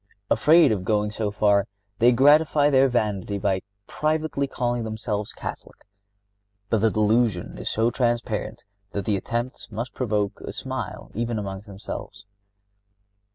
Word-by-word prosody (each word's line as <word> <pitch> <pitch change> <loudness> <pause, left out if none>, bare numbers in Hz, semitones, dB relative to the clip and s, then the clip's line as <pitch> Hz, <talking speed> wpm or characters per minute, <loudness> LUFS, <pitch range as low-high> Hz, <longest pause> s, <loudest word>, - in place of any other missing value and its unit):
Afraid 155 +6 +6
of 100 -4 -1
going 105 +1 +1
so 105 -1 -2
far, 100 -1 +2 0.3
they 120 +2 +6
gratify 145 +3 +5
their 135 0 +5
vanity 105 -4 -1
by 95 -1 0 0.2
privately 155 -1 -1
calling 120 -2 -1
themselves 110 -1 -3
Catholic. - - -8 0.9
But 110 - +3
the 110 +2 +3
delusion 110 - +1
is - - -3
so 115 +2 +1
transparent 120 -5 -1 0.3
that 100 -2 -3
the 105 - +1
attempt 120 +2 -4
must 115 +3 -4
provoke 105 -4 -1
a - - -6
smile - - -5
even 115 +1 -2
among 95 -2 -4
themselves. 100 0 -8
110 Hz, 135 wpm, -24 LUFS, 105-125 Hz, 0.9 s, Afraid